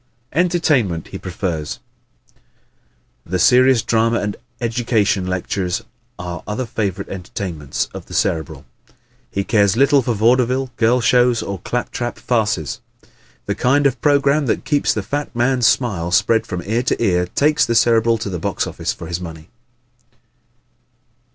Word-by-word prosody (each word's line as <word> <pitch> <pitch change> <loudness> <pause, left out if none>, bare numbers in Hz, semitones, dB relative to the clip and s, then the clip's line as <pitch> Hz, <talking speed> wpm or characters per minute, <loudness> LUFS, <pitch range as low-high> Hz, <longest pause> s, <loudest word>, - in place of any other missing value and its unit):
Entertainment 150 - +1
He - - -7
Prefers 80 -8 -4 0.6
¶ - - -33 0.9
The 95 +3 -2
serious 125 +5 +5
drama 115 0 +2
and 105 -1 -3 0.2
educational 110 -5 0
lectures 90 0 -2 0.3
are 90 -1 -6
other 105 +5 -2
favorite 100 -4 -3
entertainments 90 -5 -4
of - - -9
the - - -8
Cerebral. 80 -4 -1 0.6
He 100 - -2
cares 100 -1 +2
little 140 +1 +5
for 120 -1 -1
vaudeville, 125 +4 +2
girl 120 +2 +3
shows, 120 0 +3
or 100 -2 -5
clap 125 +7 -3
trap 120 0 -4
farces. 105 - -1 0.7
The 100 - -1
kind 135 +7 +2
of 135 -3 +1
program 145 -1 +3
that - - -1
keeps 145 -2 +1
the 105 - -2
fat 145 +8 -4
man's 120 -1 +2
smile 95 -10 +1
spread 105 +4 +2
from 90 -3 -4
ear 110 +4 0
to 125 - -1
ear 90 -5 +1
takes 150 +10 +2
the 115 - 0
Cerebral 115 0 +4
to 110 -2 -4
the 90 - -3
box - - -1
office - - -3
for - - -8
his 85 +2 -4
money. 80 -2 -9
110 Hz, 150 wpm, -19 LUFS, 90-125 Hz, 0.9 s, serious